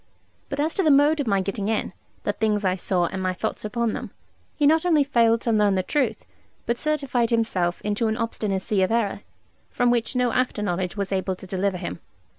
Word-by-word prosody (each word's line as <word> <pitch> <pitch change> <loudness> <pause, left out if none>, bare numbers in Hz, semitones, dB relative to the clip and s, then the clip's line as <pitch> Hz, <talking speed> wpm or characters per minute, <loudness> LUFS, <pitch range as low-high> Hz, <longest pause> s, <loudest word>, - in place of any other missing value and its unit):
But 280 - -4
as 310 +2 +1
to - - 0
the 320 - +3
mode 295 +2 +5
of 280 - -1
my 200 -2 +2
getting 195 +1 -3
in, 220 -4 -1 0.3
the 205 - 0
things 210 -1 0
I 185 0 +2
saw, 180 -1 0
and 190 +2 -4
my 185 0 0
thoughts 220 +4 -3
upon 230 +1 -1
them, 245 -3 -5 0.5
he 295 - +1
not 315 +2 +4
only 320 -5 +4
failed 230 -4 +3
to 235 - 0
learn 210 -2 +3
the 185 - 0
truth, 240 -3 -1 0.4
but 235 +1 -1
certified 275 -6 0
himself 195 -7 0
into 210 +2 0
an 220 0 -1
obstinacy 210 -4 -1
of 185 - +2
error, 230 -3 0 0.5
from 245 0 +2
which 240 +2 0
no 250 -1 +2
after 250 -4 0
knowledge 180 0 -2
was 200 -1 -2
able 190 -1 -1
to 185 - -12
deliver 190 0 -1
him. 175 -1 -5
220 Hz, 215 wpm, -24 LUFS, 195-245 Hz, 0.5 s, mode